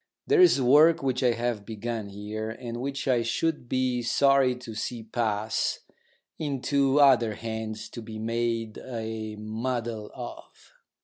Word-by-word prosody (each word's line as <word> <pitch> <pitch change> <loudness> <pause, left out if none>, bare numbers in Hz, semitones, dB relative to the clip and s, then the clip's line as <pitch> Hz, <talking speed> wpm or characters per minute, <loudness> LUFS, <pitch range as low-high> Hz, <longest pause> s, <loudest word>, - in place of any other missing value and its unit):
There 420 -3 +4
is 360 - +6
work 150 +5 +5
which 130 -1 0
I 125 -2 +3
have 115 -2 -2
begun 110 -1 -5
here, 105 +2 -5
and 120 +1 -6
which 140 +1 -3
I 125 -3 +3
should 125 +3 -1
be 130 -1 0
sorry 135 +2 +3
to 125 -2 -9
see 115 +2 -4
pass 110 -1 -1 0.6
into 140 -1 +1
other 120 -6 +5
hands 110 -1 -5
to 120 - -8
be 110 -1 -8
made 115 0 -2
a 110 -3 -5
muddle 110 0 -3
of. - - -10
120 Hz, 140 wpm, -27 LUFS, 110-130 Hz, 0.6 s, is